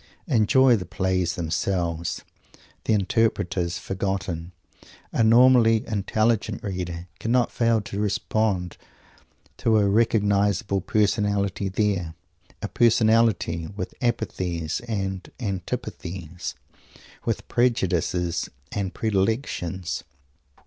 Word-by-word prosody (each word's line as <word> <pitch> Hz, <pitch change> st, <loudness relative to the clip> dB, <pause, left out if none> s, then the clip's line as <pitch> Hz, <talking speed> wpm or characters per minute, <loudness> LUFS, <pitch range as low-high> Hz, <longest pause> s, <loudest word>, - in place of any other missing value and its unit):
Enjoying 125 Hz, -, +4 dB
the 90 Hz, -, -6 dB
plays 95 Hz, 0 st, 0 dB
themselves 85 Hz, 0 st, -2 dB, 0.6 s
the 110 Hz, -, +2 dB
interpreters 95 Hz, -4 st, +1 dB
forgotten 90 Hz, -2 st, -3 dB, 0.6 s
a -, -, +2 dB
normally 115 Hz, -1 st, +6 dB
intelligent 110 Hz, +1 st, 0 dB
reader 90 Hz, -3 st, -4 dB
cannot 120 Hz, +2 st, +1 dB
fail 115 Hz, -2 st, +2 dB
to 100 Hz, 0 st, -6 dB
respond 105 Hz, -3 st, 0 dB, 0.8 s
to 110 Hz, -1 st, +3 dB
a 105 Hz, -1 st, +3 dB
recognisable 100 Hz, -2 st, +2 dB
Personality 100 Hz, -1 st, +1 dB
there, 95 Hz, -5 st, -1 dB, 0.5 s
a -, -, 0 dB
Personality 110 Hz, -7 st, +3 dB
with 100 Hz, +5 st, -6 dB
apathies 90 Hz, -9 st, -1 dB
and 95 Hz, -4 st, -3 dB
antipathies, 90 Hz, -, -5 dB, 0.7 s
with -, -, -2 dB
prejudices 90 Hz, -8 st, 0 dB, 0.2 s
and 100 Hz, -3 st, -3 dB
predilections. 95 Hz, -, -1 dB
100 Hz, 85 wpm, -25 LUFS, 90-110 Hz, 0.8 s, normally